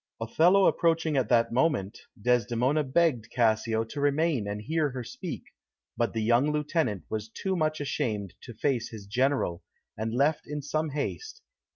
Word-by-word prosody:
Othello 175 - +4
approaching 165 -2 +2
at 130 -5 +1
that 115 -1 +3
moment, 120 - 0 0.2
Desdemona 125 +5 +2
begged 130 -5 +1
Cassio 115 -1 +1
to 140 +6 -6
remain 145 -5 +1
and 105 0 -3
hear 155 +6 0
her 130 -2 -5
speak, 190 - -6 0.5
but 120 - 0
the 110 -1 -1
young 120 +6 +3
lieutenant 150 - -1
was 110 0 -4
too 190 - -3
much 155 -2 0
ashamed 105 -9 -2
to 120 - -10
face 125 -3 0
his 110 -3 -9
General, 125 -5 0 0.3
and 110 +1 -3
left 140 +6 +1
in 150 -1 -4
some 155 +2 -1
haste. 435 - -5
130 Hz, 160 wpm, -28 LUFS, 115-155 Hz, 0.5 s, Othello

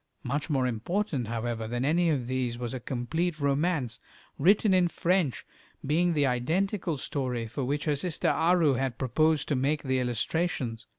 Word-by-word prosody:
Much 140 +6 -2
more 135 -4 +1
important, 130 - -1
however, 115 0 -3
than 120 +3 -2
any 170 +3 +3
of 140 -6 0
these 125 -1 -2
was 120 0 -4
a 130 - -3
complete 155 +8 -2
romance, 140 -2 0 0.4
written 200 +5 +4
in 180 -1 +4
French, 170 -4 0 0.4
being 170 +5 +2
the 145 -2 +2
identical 165 - 0
story 130 -4 -2
for 120 +5 -4
which 145 +3 -1
her 150 -2 +2
sister 160 +3 -1
Aru 170 -4 +3
had 130 -2 -2
proposed 155 +4 +1
to 145 - +2
make 140 +4 0
the 130 -2 0
illustrations. 125 0 -2
140 Hz, 165 wpm, -28 LUFS, 125-165 Hz, 0.4 s, written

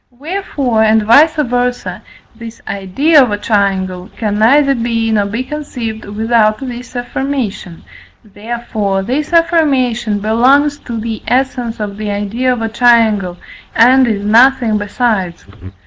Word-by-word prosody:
Wherefore, 275 - -2
and 220 0 +3
vice 290 +9 +5
versâ, 245 -4 -2 0.3
this 230 0 -10
idea 220 - +2
of 250 - +2
a 205 - -2
triangle 190 -4 -1
can 210 -2 -2
neither 275 +5 +4
be 230 -2 -1
nor 205 -2 +1
be 230 +5 -3
conceived 255 -6 -6
without 215 +1 +1
this 250 -1 -8
affirmation, 245 -8 -4 0.4
therefore, 210 -2 -4
this 275 - -3
affirmation 270 -10 +1
belongs 260 +8 +2
to 235 -2 -5
the 225 0 -5
essence 250 -2 -1
of 205 -1 -5
the 215 -1 -4
idea 205 +5 -1
of 240 -2 -2
a 225 - -2
triangle, 220 -6 +2 0.4
and 255 +2 +5
is 205 -3 -2
nothing 235 0 +3
besides. 205 -4 -2
230 Hz, 130 wpm, -14 LUFS, 210-255 Hz, 0.4 s, vice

